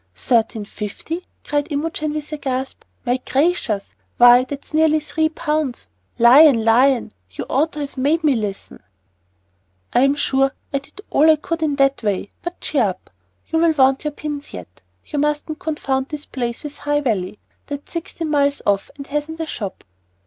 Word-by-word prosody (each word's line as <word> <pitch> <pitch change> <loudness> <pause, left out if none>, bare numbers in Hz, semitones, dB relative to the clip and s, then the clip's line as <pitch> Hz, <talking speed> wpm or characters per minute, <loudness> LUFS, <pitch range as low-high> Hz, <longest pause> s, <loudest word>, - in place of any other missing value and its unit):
"Thirteen 225 - +1
fifty," 270 - -6 0.2
cried 290 +1 -1
Imogen 305 +1 -2
with 305 0 -5
a - - -2
gasp. 265 -1 -3 0.2
"My 245 +1 +2
gracious! 265 - 0 0.2
why, 245 +1 +8
that's 280 +3 -8
nearly 310 0 +4
three 315 +1 0
pounds! 300 - -2 0.3
Lion! 240 0 +7
Lion! 245 - +3 0.2
you 90 - -6
ought 305 +5 +1
to 300 - -5
have 280 -1 -6
made 310 +5 +2
me 290 -4 +4
listen." 205 -3 -5 1.1
"I'm 275 +3 +4
sure 270 -1 +1 0.2
I 275 - +2
did 280 +8 -15
all 310 +3 +5
I 315 - +7
could 330 +2 -4
in 300 -3 +1
that 275 -2 +2
way. 205 -2 -2
But 345 +1 -6
cheer 275 -7 +1
up! 185 - -5 0.4
You'll 325 0 +3
want 270 -2 +3
your 300 - 0
pins 295 -1 -6
yet. - - -11 0.2
You 295 - -3
mustn't 300 +1 -1
confound 270 -4 -2
this 300 -1 -6
place 240 0 -4
with 295 -1 -7
High 290 0 0
Valley. 210 -7 -1 0.3
That's 285 0 -7
sixteen 330 -1 -4
miles 285 -1 +2
off 200 -1 +1
and 280 - -7
hasn't 295 +3 -3
a 325 - -1
shop." 205 -10 -6
285 Hz, 170 wpm, -20 LUFS, 245-305 Hz, 1.1 s, why